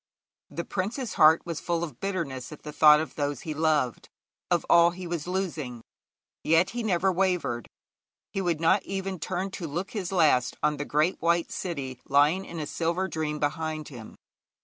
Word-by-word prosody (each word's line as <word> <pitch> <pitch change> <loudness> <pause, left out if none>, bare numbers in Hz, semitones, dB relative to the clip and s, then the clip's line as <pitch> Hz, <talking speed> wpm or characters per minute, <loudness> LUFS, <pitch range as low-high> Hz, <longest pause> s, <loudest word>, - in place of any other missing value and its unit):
The 170 - -5
prince's 220 +6 -3
heart 155 +1 +6
was 165 -3 -4
full 170 -1 -1
of 160 - -7
bitterness 165 -11 -3
at 150 - -11
the 150 - -7
thought 150 0 +7
of 160 - -4
those 145 -3 -2
he 155 - -4
loved, 150 -6 0 0.4
of - - +1
all 170 0 +6
that 175 - -9
he 185 - -6
was 170 -2 -4
losing. 155 -11 -3 0.6
Yet 165 +3 +3
he 240 - -3
never 190 -3 +2
wavered. 180 - 0 0.6
He 195 - -2
would 170 -4 0
not 165 +5 +3
even 195 -1 -4
turn 185 +4 -3
to 175 -3 -5
look 175 +6 -4
his 195 -5 -4
last 150 -9 +3
on 150 0 +2
the 145 - -3
great 155 +6 +1
white 170 0 +1
city 140 -9 -5
lying 150 +7 +3
in 170 - -8
a 155 - -3
silver 170 +5 -1
dream 155 -2 -3
behind 155 +1 -2
him. 120 -6 -10
165 Hz, 185 wpm, -27 LUFS, 150-185 Hz, 0.6 s, thought